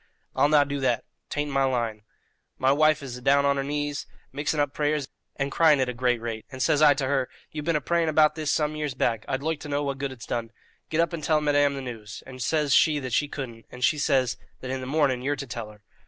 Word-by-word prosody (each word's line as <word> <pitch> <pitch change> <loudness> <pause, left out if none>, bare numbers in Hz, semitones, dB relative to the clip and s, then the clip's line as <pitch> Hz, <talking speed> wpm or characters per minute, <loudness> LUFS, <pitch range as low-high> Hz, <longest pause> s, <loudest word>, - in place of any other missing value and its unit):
"I'll 145 - +4
not 145 -2 +5
do 140 0 -3
that. 125 -4 +1 0.3
'Tain't 145 0 -2
in - - -5
my 135 0 +3
line. 120 -5 -1 0.6
My 130 +1 +3
wife 155 +1 +3
is 125 -2 -6
adown 140 +3 +3
on 140 0 +2
her 135 - 0
knees, 145 0 -3 0.2
mixing 145 +2 -1
up 145 -1 +1
prayers 150 -2 0 0.3
and 140 0 -2
crying 155 -2 +5
at 130 -1 +1
a - - -2
great 125 -1 +1
rate; 115 -1 -5
and 130 - -8
says 145 +3 +2
I 145 -2 +7
to 135 -1 -1
her, 135 -1 0 0.2
'You've 150 -1 -5
been 165 -1 +1
a 150 - +1
praying 170 0 +1
about 155 0 +4
this 155 -2 -3
some 150 0 +1
years 150 -3 -3
back; 115 -4 0
I'd 130 +1 -2
loike 160 -1 -1
to 150 - -8
know 145 0 0
what 140 -1 -3
good 140 -1 -2
it's 125 -3 -10
done. 115 -1 -3 0.4
Get 160 - +2
up 170 +1 0
and 160 -3 -4
tell 155 0 +3
madame 145 -1 +2
the 135 - -4
news;' 110 -5 -8
and 130 -1 -10
says 150 0 +1
she 155 -2 +5
that 130 -4 -4
she 145 - +2
couldn't, 120 -6 -7
and 125 0 -8
she 155 +2 +3
says 130 -3 +2 0.2
that 130 - -5
in 130 0 -3
the 130 - -6
morning 135 -3 +1
you're 145 +3 0
to 140 - -6
tell 115 -3 -6
her." 105 -1 -17
140 Hz, 260 wpm, -26 LUFS, 130-150 Hz, 0.6 s, I